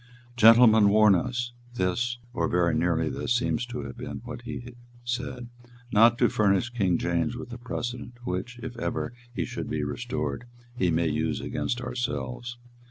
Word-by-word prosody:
"Gentlemen 110 -2 +7
warn 105 0 +6
us" 120 +5 -1 0.2
this, 120 +6 0 0.2
or 85 -5 0
very 85 -1 +2
nearly 80 0 +1
this, 120 - -1
seems 120 -1 0
to 120 0 -5
have - - -8
been 125 0 -6
what 120 0 -7
he 125 0 -7 0.3
said 125 0 -4 0.4
"not 115 +2 +6
to 120 - +4
furnish 105 +2 +2
King 95 -8 +1
James 85 +7 0
with 120 - -8
a 120 - -7
precedent 120 0 -5
which, 95 +6 -4
if 125 -1 -6
ever 120 - -2 0.2
he 120 - -2
should - - -5
be 75 -1 -1
restored, 120 - -3 0.3
he 90 -7 +1
may 85 0 +2
use 80 +1 -1
against 120 - -2
ourselves. 120 0 -4
120 Hz, 165 wpm, -27 LUFS, 90-120 Hz, 0.4 s, Gentlemen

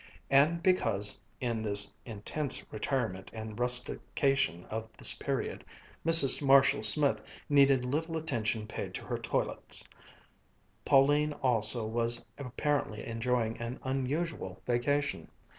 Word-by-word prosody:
And 155 +5 +3
because, 105 - +1 0.2
in 120 -3 -3
the 105 -2 +1 0.3
intense 125 +6 -5
retirement 110 -4 -3
and 110 0 -8
rustication 125 -5 +1
of 110 0 -6
this - - +3
period, - - -4 0.4
Mrs. 165 -5 +9
Marshall 135 0 +4
Smith 145 -2 +2 0.3
needed 140 -3 +3
little 160 +5 -3
attention 115 -8 -3
paid 110 - -7
to - - -7
her - - -4
toilets, - - -3 1.0
Pauline 145 +2 +3
also 120 -3 -1
was 115 +1 -2
apparently 140 -3 -3
enjoying 115 0 -2
an 120 +2 -6
unusual 135 - -4
vacation. 130 - -2
125 Hz, 110 wpm, -30 LUFS, 110-145 Hz, 1.0 s, Mrs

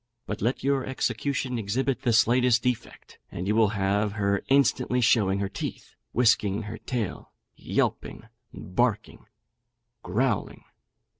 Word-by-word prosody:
But 105 +1 -5
let 120 +5 -1
your 135 -1 +1
execution 130 0 -2
exhibit 120 +5 -1
the 120 - +1
slightest 120 +1 +3
defect, 125 -3 -4
and 90 - -5
you 105 - +2
will 110 -1 +5
have 100 0 0
her 100 -1 0
instantly 135 -2 +2
showing 105 -5 +3
her 100 - 0
teeth, - - -7 0.2
whisking 110 -3 +2
her 105 +1 -7
tail, 115 -6 -4 0.2
yelping, - - -2 0.3
barking, 105 +3 -2
and 120 +1 -50
growling. 115 +4 -1
115 Hz, 130 wpm, -26 LUFS, 105-125 Hz, 0.3 s, will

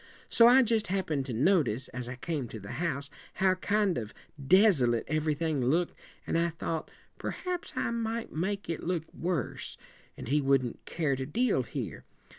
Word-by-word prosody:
So 230 - +7
I 260 +2 +7
just 225 -2 +1
happened 160 -8 -1
to 125 - -3
notice, 130 - +2
as 125 0 -6
I 125 - -5
came 145 -1 -3
to 110 - -8
the 100 0 -8
house, 140 -5 -2 0.2
how 190 0 +3
kind 200 -1 +1
of 110 -2 -8 0.3
desolate 140 - +5
everything 155 -2 0
looked, 165 +8 +1 0.3
and 165 - +1
I 170 0 +2
thought 165 -1 -4 0.3
perhaps 360 -1 -4
I - - 0
might 230 0 -3
make 195 +5 -2
it 165 -1 -3
look 170 -2 -1
worse, 170 -7 -3 0.4
and - - -7
he 145 +4 +2
wouldn't 135 -3 +1
care 150 -5 0
to 130 0 -4
deal 225 - +2
here. - - -5
165 Hz, 170 wpm, -30 LUFS, 135-195 Hz, 0.4 s, So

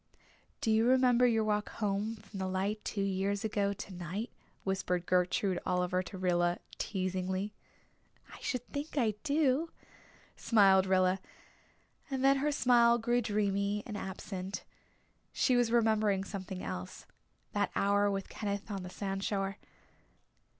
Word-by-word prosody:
"Do 220 - +1
you 220 +2 +4
remember 250 -1 +5
your 225 -2 +2
walk 210 -1 0
home 210 +1 -1
from 205 -2 -10
the 190 - -1
light 195 +3 -1
two 200 - -2
years 195 +2 -1
ago 205 -2 +1
tonight?" 195 +1 -5 0.3
whispered 180 -2 -1
Gertrude 180 +1 +1
Oliver 180 0 +1
to 190 +1 -8
Rilla, 175 -1 +1 0.2
teasingly. 185 +1 -2 0.8
"I - - -11
should 250 -2 -3
think 295 +1 -4
I 225 -5 +3
do," 300 +1 +2 0.7
smiled 195 -4 +5
Rilla; 185 0 +3 0.9
and 265 -1 -1
then 275 0 +6
her 295 +2 +1
smile 240 -4 +5
grew 240 +1 +1
dreamy 205 -1 0
and 215 - -6
absent; 190 -1 -5 0.7
she 255 - +3
was 240 -2 +3
remembering 215 -4 +3
something 190 -1 -6
else 90 0 -6 0.5
that - - 0
hour 205 +1 +3
with 195 -1 -2
Kenneth 205 0 -4
on 195 -2 -3
the 180 - -7
sandshore. 195 +1 -2
200 Hz, 135 wpm, -32 LUFS, 190-225 Hz, 0.9 s, then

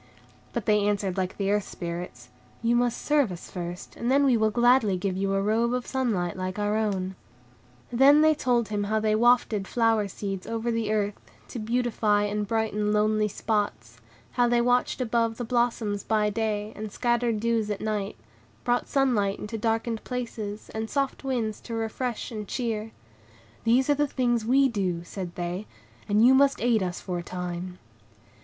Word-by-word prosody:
But 235 - -3
they 210 -1 +4
answered 200 -3 0
like 185 -1 -2
the 200 -1 0
Earth 205 -1 0
Spirits. 170 -8 -6 0.3
"You 235 +1 +3
must 245 -1 +1
serve 290 -8 +2
us 175 - -9
first, 175 -1 -6
and 235 - -2
then 280 +1 +4
we 260 -3 +4
will 220 -1 +3
gladly 240 -3 +3
give 185 0 -2
you 195 +1 0
a 195 - +1
robe 230 +4 +1
of 250 - -3
sunlight 220 -10 -1
like 185 +1 -4
our 205 0 0
own." 195 -4 -1 0.8
And 240 - -3
then 285 +3 +7
they 310 0 +6
told 245 -6 +1
him 205 -1 -1
how 215 +1 +1
they 215 0 +1
wafted 225 -3 +3
flower 225 -3 +2
seeds 195 -1 -5
over 230 +1 -2
the 225 -2 -1
earth, 205 -1 -1 0.3
to 240 - -5
beautify 220 -2 +1
and 205 0 -1
brighten 210 -1 0
lonely 215 0 +2
spots; 120 - -2 0.3
how 245 -1 +2
they 240 0 +3
watched 245 +2 +1
above 230 -2 0
the 245 - -3
blossoms 230 -4 0
by 210 -1 +1
day, 215 -1 -2
and 215 0 -6
scattered 240 -2 0
dews 225 -1 0
at 205 -1 -2
night, 210 -2 -2 0.5
brought 245 0 +1
sunlight 235 -8 +1
into 210 +2 -6
darkened 225 +1 -1
places, 225 -4 -5
and 220 0 -3
soft 275 -1 -1
winds 235 -6 -2
to 230 - -6
refresh 225 +2 -3
and 210 -2 -5
cheer. 225 -3 -3 0.7
"These 245 +3 +4
are 290 - +4
the 295 +1 +1
things 240 -4 0
we 270 +3 +4
do," 185 -8 -2
said 175 -1 -7
they, 180 +4 -4 0.4
"and 210 +3 +5
you 260 - +7
must 275 +1 +4
aid 235 -2 +2
us 180 -1 -2
for 180 -2 -4
a - - -4
time." 180 0 -5
220 Hz, 180 wpm, -26 LUFS, 200-240 Hz, 0.8 s, then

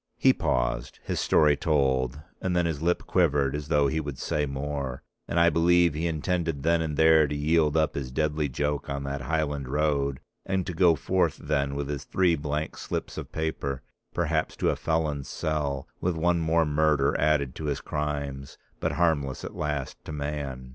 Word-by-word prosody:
He - - +5
paused, - - -1
his - - -2
story 75 -2 +4
told, 70 -4 +1 0.2
and 95 -2 -1
then 90 -1 +2
his 80 -3 -2
lip 85 +2 +1
quivered 75 -7 +2
as 75 -1 -4
though 75 -1 +3
he 80 +3 +1
would 75 -4 -5
say 75 +3 -1
more, 70 -1 -4 0.2
and 85 - 0
I 85 0 +5
believe 85 0 +4
he 80 +3 -1
intended 80 -2 -1
then 85 +1 +3
and 75 -2 -2
there 80 -1 +6
to 75 - -3
yield 75 +1 +2
up 80 -1 +2
his 65 -2 -4
deadly 75 +1 0
joke 75 +3 -2
on 70 0 -3
that 70 0 -3
Highland 75 -1 -1
road 70 -2 0 0.2
and 95 -2 -1
to 90 - -4
go 85 -1 +5
forth 85 +2 +1
then 70 -2 -1
with 70 0 -2
his 70 -1 -4
three 90 0 +2
blank 75 +1 -3
slips - - -4
of - - -7
paper, 70 -4 -3 0.3
perhaps - - 0
to - - +1
a - - -1
felon's 75 -4 -1
cell, 70 -3 -2
with 90 -1 0
one 85 +1 +2
more 80 0 +2
murder 75 -2 +2
added 75 -4 +2
to 80 - -5
his 70 -1 -1
crimes, 70 -2 -4 0.2
but - - -1
harmless 70 -6 +1
at - - -6
last 75 -3 -3
to - - -6
man. 70 -3 -4
75 Hz, 190 wpm, -27 LUFS, 70-80 Hz, 0.3 s, there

